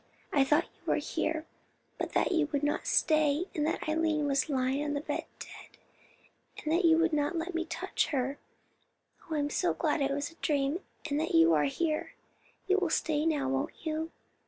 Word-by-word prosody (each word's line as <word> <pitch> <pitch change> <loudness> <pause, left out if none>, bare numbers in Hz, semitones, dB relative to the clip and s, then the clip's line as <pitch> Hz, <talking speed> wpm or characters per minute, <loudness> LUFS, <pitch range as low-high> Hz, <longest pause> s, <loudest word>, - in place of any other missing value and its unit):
"I 280 - +5
thought 295 +4 +3
you - - -24
were - - +3
here, 320 0 -2 0.5
but - - -3
that - - +2
you 325 -4 +2
would 285 -1 -1
not 295 - 0
stay, 310 +1 +3
and 300 -1 0
that 320 - -2
Eileen 310 -1 +1
was 275 +2 +1
lying 265 +1 0
on 295 -1 -2
the - - 0
bed - - -3
dead, - - -11 0.8
and 310 - -2
that 350 +2 +3
you 325 -1 +6
would 335 0 +2
not 295 +4 +1
let 335 +2 -3
me 335 0 -1
touch 335 - -1
her. 275 -1 -1 0.9
Oh, 320 - -1
I - - +1
am 290 0 0 0.3
glad 315 -2 +1
it 275 - +2
was 285 +2 -2
a - - -19
dream, 285 +1 0 0.3
and 290 -1 0
that 320 - -1
you 165 0 +6
are 150 -2 +3
here. 310 - -1 0.5
You 385 +1 +3
will 365 -3 0
stay 310 -1 +1
now, 290 -4 +1
won't 270 +5 -3
you? 315 +1 -2
305 Hz, 200 wpm, -30 LUFS, 285-325 Hz, 0.9 s, you